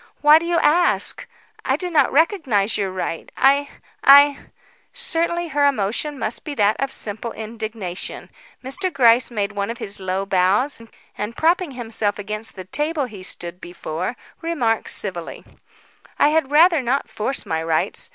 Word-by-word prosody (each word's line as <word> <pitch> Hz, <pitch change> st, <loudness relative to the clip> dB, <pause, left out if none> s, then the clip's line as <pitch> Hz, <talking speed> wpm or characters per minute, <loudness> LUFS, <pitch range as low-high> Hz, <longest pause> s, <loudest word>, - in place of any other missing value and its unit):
Why 300 Hz, +1 st, +7 dB
do 335 Hz, -, -5 dB
you 345 Hz, 0 st, +1 dB
ask? 345 Hz, +3 st, +2 dB, 0.4 s
I -, -, +1 dB
do 360 Hz, -1 st, -4 dB
not 315 Hz, -, +3 dB
recognise 275 Hz, -, +2 dB
your 195 Hz, -2 st, -1 dB
right. 185 Hz, -3 st, -5 dB
I 280 Hz, +1 st, +3 dB, 0.3 s
I 285 Hz, 0 st, +6 dB, 0.2 s
" -, -, -30 dB, 0.2 s
Certainly 345 Hz, -7 st, -1 dB
her 285 Hz, -1 st, +3 dB
emotion 275 Hz, +4 st, -1 dB
must -, -, -4 dB
be 295 Hz, -2 st, -6 dB
that 210 Hz, -2 st, +3 dB
of 275 Hz, -1 st, -1 dB
simple 220 Hz, +2 st, -5 dB
indignation. 220 Hz, -4 st, -6 dB, 0.3 s
Mr. 365 Hz, +9 st, -3 dB
Gryce 245 Hz, -4 st, +4 dB
made 210 Hz, -4 st, -2 dB
one 200 Hz, 0 st, -3 dB
of 230 Hz, -, -4 dB
his 200 Hz, -2 st, -6 dB
low 190 Hz, +1 st, -2 dB
bows, 195 Hz, +8 st, +2 dB, 0.3 s
and 210 Hz, +3 st, -5 dB
propping 335 Hz, -1 st, +1 dB
himself 225 Hz, -4 st, -2 dB
against 215 Hz, +2 st, -6 dB
the 185 Hz, -2 st, -8 dB
table 295 Hz, -, -1 dB
he 210 Hz, -6 st, -10 dB
stood 180 Hz, -1 st, -7 dB
before, 175 Hz, +4 st, -5 dB, 0.3 s
remarked 275 Hz, -10 st, -1 dB
civilly: 180 Hz, -5 st, -5 dB, 0.7 s
"I 290 Hz, -, +4 dB
had 315 Hz, -3 st, +1 dB
rather 325 Hz, +1 st, +5 dB
not 260 Hz, +3 st, -1 dB
force 240 Hz, +5 st, -3 dB
my 160 Hz, -4 st, -2 dB
rights. 160 Hz, -1 st, 0 dB
235 Hz, 160 wpm, -21 LUFS, 200-295 Hz, 0.7 s, Why